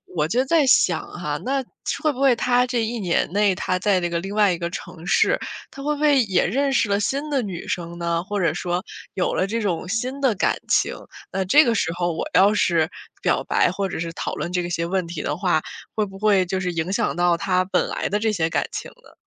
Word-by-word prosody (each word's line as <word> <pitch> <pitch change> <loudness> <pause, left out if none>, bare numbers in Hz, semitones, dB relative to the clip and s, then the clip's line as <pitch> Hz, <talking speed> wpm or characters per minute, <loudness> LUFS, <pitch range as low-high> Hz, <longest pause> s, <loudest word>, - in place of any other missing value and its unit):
我 150 -3 +2
就 245 +11 +1
在 310 +1 +3
想 260 - +4
哈， - - -3
那 270 +1 0 0.4
会 305 -2 +2
不 260 - -7
会 270 -2 +6
他 245 +1 +2
这 245 -1 -1
一 235 +2 -3
年 180 -5 0
内， 205 -1 +3
他 185 +1 -1
在 190 0 +2
这 175 -1 -1
个 170 0 -1
另 195 +3 -6
外 205 -3 +4
一 - - -3
个 170 0 -3
城 175 -2 -8
市， - - +3 0.3
他 275 - -10
会 300 +1 0
不 - - -9
会 290 -4 +5
也 195 -4 +1
认 275 +9 +1
识 245 - +2
了 200 - +2
新 280 +8 -1
的 280 -3 +1
女 190 -6 -6
生 170 -1 -4
呢？ 170 0 -1
或 205 +2 -3
者 165 -5 +2
说， 175 +1 -2 0.3
有 185 - 0
了 185 - +1
这 230 +3 -2
种 180 -4 -2
新 250 +6 -2
的 265 -4 +3
感 - - +1
情， - - +2 0.4
那 190 - -1
这 290 +12 +6
个 235 - +2
时 165 - 0
候 175 -1 -1
我 160 - -3
要 195 +3 +6
是 170 -5 +2 0.3
表 - - +1
白 - - +2
或 195 +1 -2
者 - - -4
是 165 0 -4
讨 - - -4
论 - - -3
这 180 - +1
个 175 - -4
些 170 -1 -1
问 185 +1 -1
题 165 -2 -5
的 145 - -2
话， 175 -2 +1 0.3
会 215 - +1
不 195 -1 -11
会 200 -3 +3
就 185 +1 -2
是 180 -1 -1
影 165 +1 -2
响 215 +1 0
到 175 0 +3
他 185 +1 +1
本 190 - 0
来 - - -2
的 205 - 0
这 220 +1 +1
些 165 -6 0
感 - - 0
情 - - -5
呢？ - - -21
195 Hz, 270 characters per minute, -23 LUFS, 175-230 Hz, 0.4 s, 会